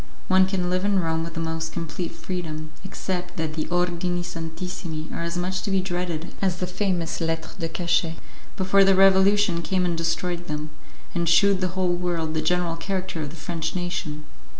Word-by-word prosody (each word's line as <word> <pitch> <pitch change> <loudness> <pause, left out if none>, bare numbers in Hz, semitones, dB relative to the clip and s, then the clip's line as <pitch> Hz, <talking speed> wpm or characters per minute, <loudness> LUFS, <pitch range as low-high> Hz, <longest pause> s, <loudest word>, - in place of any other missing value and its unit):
One 190 0 +6
can 190 -2 0
live 185 +1 +1
in 200 -1 +3
Rome 160 -2 0
with 165 0 -6
the - - -2
most 160 0 -2
complete 165 +1 -3
freedom, 155 -4 -5
except 180 -2 -4
that 160 -1 -1
the 155 -1 -2
'ordini 175 0 0
santissimi' 165 -1 -5
are - - -3
as 170 +1 -2
much 185 +1 -1
to - - -3
be 195 -1 +3
dreaded 175 -3 -2
as 190 -3 +2
the 180 - -2
famous 180 -3 -1
Lettres 165 0 -1
de 165 -2 -1
cachet 170 -1 +1 0.4
before 195 0 +5
the 195 0 +6
Revolution 195 -1 +5
came 185 +1 +1
and 175 -1 +1
destroyed 170 +1 -1
them, 150 0 -4 0.4
and 170 -2 +1
shewed 195 +2 +5
the 185 0 -1
whole 180 -1 +2
world 175 -3 -1
the 155 - 0
general 175 +1 +1
character 185 -1 -2
of 150 - -3
the 160 - -10
French 165 0 -3
nation. 160 -4 -3
175 Hz, 190 wpm, -25 LUFS, 165-185 Hz, 0.4 s, One